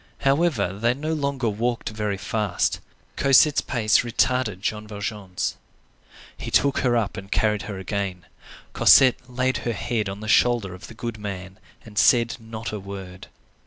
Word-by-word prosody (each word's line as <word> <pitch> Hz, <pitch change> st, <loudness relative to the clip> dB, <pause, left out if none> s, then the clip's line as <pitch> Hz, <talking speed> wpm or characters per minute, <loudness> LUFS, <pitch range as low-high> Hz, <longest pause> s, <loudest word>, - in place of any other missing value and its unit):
However, 135 Hz, -, +2 dB
they 115 Hz, +5 st, 0 dB
no 155 Hz, +4 st, -3 dB
longer 140 Hz, -5 st, -1 dB
walked 115 Hz, +3 st, -1 dB
very 105 Hz, -2 st, -3 dB
fast. 105 Hz, -2 st, -1 dB, 0.4 s
Cosette's 140 Hz, +2 st, +5 dB
pace 110 Hz, -4 st, +2 dB
retarded 120 Hz, -3 st, 0 dB
Jean 105 Hz, 0 st, -3 dB
Valjean's. 100 Hz, -3 st, -4 dB, 0.8 s
He -, -, -6 dB
took 140 Hz, 0 st, +2 dB
her 120 Hz, -2 st, +2 dB
up 110 Hz, -2 st, -2 dB
and 100 Hz, 0 st, -9 dB
carried 105 Hz, -1 st, +1 dB
her 100 Hz, -, -5 dB
again. 95 Hz, -1 st, -4 dB, 0.5 s
Cosette 130 Hz, -1 st, +5 dB
laid 130 Hz, 0 st, 0 dB
her 115 Hz, 0 st, -2 dB
head 110 Hz, -2 st, -2 dB
on 95 Hz, +1 st, -6 dB
the 110 Hz, -, -7 dB
shoulder 110 Hz, -2 st, +3 dB
of 90 Hz, -, -10 dB
the 115 Hz, -, -12 dB
good 115 Hz, -1 st, -5 dB
man 95 Hz, -1 st, -7 dB, 0.3 s
and 105 Hz, -2 st, -3 dB
said 120 Hz, -1 st, +4 dB
not 115 Hz, 0 st, -7 dB
a 105 Hz, -, -4 dB
word. 95 Hz, -2 st, -9 dB
110 Hz, 160 wpm, -24 LUFS, 100-125 Hz, 0.8 s, Cosette's